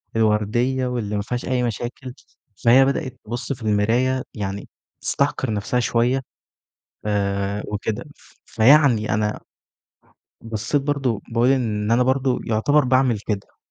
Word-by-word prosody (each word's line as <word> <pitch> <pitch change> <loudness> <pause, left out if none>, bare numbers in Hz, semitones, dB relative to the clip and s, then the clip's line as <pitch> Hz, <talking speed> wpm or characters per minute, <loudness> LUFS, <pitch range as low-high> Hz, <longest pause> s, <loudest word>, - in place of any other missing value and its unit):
الوردية 115 +4 +1
واللي 110 -4 -3
ما 105 - 0
فيهاش 120 +4 -4
أي 125 -1 0
مشاكل، 120 +2 -4 0.5
فهي 130 +3 +7
بدأت 140 -1 -2
تبُص 120 +5 -4
في 125 - -13
المراية 115 +5 +1
يعني 100 -2 -5 0.3
تستحقر - - 0
نَفْسها 105 +4 -1
شوية 120 +2 +1 0.9
آآ، 100 0 -1
وكده، 105 +6 -3
ف - - -22
فيعني 120 -3 +4
أنا 105 0 -1 1.0
بصّيت 115 +5 -1
برضه، 135 -7 -1
باقول 115 +2 +2
إن 110 -5 0
أنا 120 +2 +4
برضه 130 0 +1
يعتبر 130 +6 +2
باعمِل 130 -3 +2
كده. 105 -2 -4
120 Hz, 125 wpm, -22 LUFS, 105-130 Hz, 1.0 s, فهي